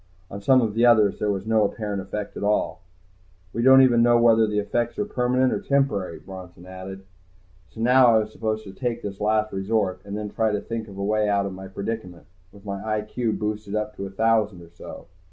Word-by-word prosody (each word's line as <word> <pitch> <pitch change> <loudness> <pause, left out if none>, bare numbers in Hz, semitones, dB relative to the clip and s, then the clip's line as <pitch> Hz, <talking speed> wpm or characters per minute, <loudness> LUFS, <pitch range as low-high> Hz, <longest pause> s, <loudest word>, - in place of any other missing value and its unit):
On 100 - -7
some 130 +4 +4
of 110 -2 -1
the 115 +2 +1
others 110 -4 +4
there 105 - 0
was 100 -1 -2
no 110 -1 +3
apparent 105 -1 -3
effect 100 +1 -6
at - - -6
all. 105 -1 0 0.7
"We 115 - -2
don't 130 +2 +7
even 120 -2 +4
know 120 0 +5
whether 115 -1 +5
the 105 0 -2
effects 120 +3 -1
are 210 - -1
permanent 125 -7 +1
or - - -1
temporary," 120 -11 0
Bronson 90 -2 -11
had 95 +1 -11
added. 95 0 -9 0.6
So 100 +7 -9
now 125 +2 +5
I 115 -2 +5
was 110 -1 -1
supposed 110 -1 -3
to 95 -2 -11
take 120 +2 -3
this 100 -1 -6
Last 110 0 +1
Resort 95 -1 -1
and 100 0 -6
then 105 -1 -5
try 110 -2 0
to 105 - 0
think 115 -1 -5
of 100 -2 -11
a 100 - -3
way 105 +1 +1
out 100 -1 +1
of 100 - -5
my 95 +1 -9
predicament, 95 -4 -6 0.3
with 100 0 -17
my 100 0 -5
I.Q. 110 +1 -2
boosted 105 -1 -4
up 105 0 -3
to 100 - -4
a - - -9
thousand 105 -3 +1
or 85 - -16
so. 85 - -11
105 Hz, 225 wpm, -24 LUFS, 100-115 Hz, 0.7 s, don't